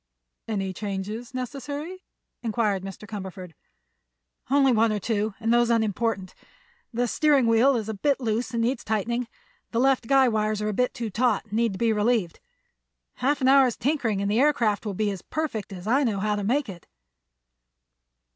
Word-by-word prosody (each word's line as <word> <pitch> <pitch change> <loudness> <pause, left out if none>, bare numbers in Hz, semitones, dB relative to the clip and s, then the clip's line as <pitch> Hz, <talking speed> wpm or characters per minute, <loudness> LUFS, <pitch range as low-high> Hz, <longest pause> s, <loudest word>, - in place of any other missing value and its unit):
"Any 195 -4 -2
changes 205 +4 -5
necessary?" 285 +8 -5 0.4
inquired 220 -4 0
Mr. 195 +2 -9
Cumberford. 190 -4 -7 1.0
"Only 275 -1 +4
one 225 -1 +3
or 210 - 0
two, 210 0 -1
and 225 +1 +1
those 240 0 +3
unimportant. 220 -3 0 0.6
The 245 +1 0
steering 285 0 +3
wheel 230 +4 +4
is 225 -3 -1
too 220 +7 0
loose 230 -1 -1
and 230 -1 -1
needs 240 +1 -1
tightening. 230 +3 -1 0.4
The 230 - -1
left 260 -2 +2
guy 270 0 +5
wires 215 -2 0
are 210 0 -1
a - - -2
bit 250 +5 0
too 230 -3 -4
taut 245 +5 +1
and 210 - -15
need 230 -1 +1
to - - -6
be 230 0 +2
relieved. 210 -4 0 0.8
Half 280 +2 0
an 260 - +3
hour's 265 -3 +5
tinkering 245 -8 0
and 200 - 0
the 220 - +2
aircraft 235 -8 +2
will 200 - -3
be 210 +1 0
as 190 -3 -6
perfect 285 -11 -4
as 180 -1 -8
I 265 +6 +3
know 215 -6 0
how 210 +1 0
to 205 - -3
make 255 +7 +1
it." 180 -4 -10
225 Hz, 175 wpm, -25 LUFS, 210-250 Hz, 1.0 s, guy